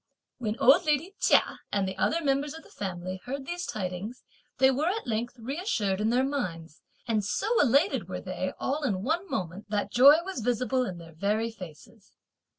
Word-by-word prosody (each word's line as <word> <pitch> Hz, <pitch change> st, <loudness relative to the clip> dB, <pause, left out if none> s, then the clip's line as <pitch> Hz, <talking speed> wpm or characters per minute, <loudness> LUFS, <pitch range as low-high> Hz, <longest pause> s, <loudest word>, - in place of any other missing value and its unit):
When 220 Hz, -2 st, -2 dB
old 270 Hz, +5 st, +6 dB
lady 305 Hz, +5 st, +1 dB
Chia -, -, +3 dB
and 200 Hz, -2 st, +1 dB
the 190 Hz, -, -4 dB
other 335 Hz, 0 st, +1 dB
members 280 Hz, +1 st, 0 dB
of 320 Hz, -, -10 dB
the -, -, -18 dB
family 185 Hz, -1 st, -5 dB
heard 270 Hz, +2 st, -4 dB
these 350 Hz, +2 st, -4 dB
tidings 195 Hz, +3 st, -5 dB, 0.3 s
they 265 Hz, 0 st, +5 dB
were 285 Hz, +5 st, 0 dB
at 420 Hz, +5 st, -1 dB
length 235 Hz, +1 st, -2 dB
reassured 230 Hz, -, -1 dB
in 215 Hz, -, +2 dB
their 250 Hz, +2 st, +3 dB
minds, 170 Hz, -, -4 dB, 0.3 s
and 220 Hz, -3 st, +1 dB
so 430 Hz, -, 0 dB
elated 285 Hz, -, +2 dB
were -, -, -4 dB
they -, -, -3 dB
all 285 Hz, +3 st, -1 dB
in 200 Hz, -9 st, -1 dB
one 340 Hz, -, -1 dB
moment 190 Hz, -, -4 dB
that 205 Hz, -1 st, -1 dB
joy 275 Hz, +5 st, +8 dB
was 385 Hz, -8 st, -4 dB
visible 245 Hz, +2 st, 0 dB
in 180 Hz, -2 st, -5 dB
their 165 Hz, -1 st, -12 dB
very 210 Hz, +7 st, 0 dB
faces. 190 Hz, +2 st, -13 dB
240 Hz, 185 wpm, -28 LUFS, 200-285 Hz, 0.3 s, joy